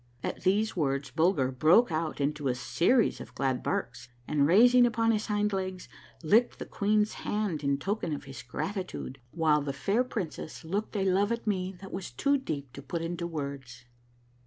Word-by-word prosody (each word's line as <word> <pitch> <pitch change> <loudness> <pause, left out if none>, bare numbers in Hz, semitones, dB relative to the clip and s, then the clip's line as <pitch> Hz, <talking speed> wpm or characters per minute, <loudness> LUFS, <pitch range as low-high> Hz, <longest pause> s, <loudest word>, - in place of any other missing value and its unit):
At - - -4
these 205 +4 +1
words 140 -4 -1
Bulger 160 -5 +2
broke 165 - +4
out 155 -1 -2
into 145 0 -1
a 125 - +1
series 130 - +2
of - - -11
glad 135 -2 0
barks, - - -3 0.2
and, 145 -2 +2
raising 245 +7 +6
upon 230 0 +2
his 215 -1 -1
hind 210 -1 0
legs, 185 -1 -3 0.4
licked 220 +9 +3
the - - -6
queen's 210 +1 +1
hand 205 -8 -2
in 140 0 +1
token 195 +2 -2
of 145 - -4
his 135 -3 -9
grati 185 - -4
tude, 135 +1 -7
while 155 0 +2
the 140 -1 -3
fair 200 - +1
princess 175 -9 -6
looked 205 +7 -3
a 195 -2 +1
love 195 +3 +2
at 235 0 -2
me 190 -3 -1
that 195 - -9
was 185 -1 -4
too 280 - +1
deep 140 - -5
to 140 - -8
put 165 +5 -4
into 170 +1 -3
words. 140 -6 -6
170 Hz, 185 wpm, -29 LUFS, 140-210 Hz, 0.4 s, raising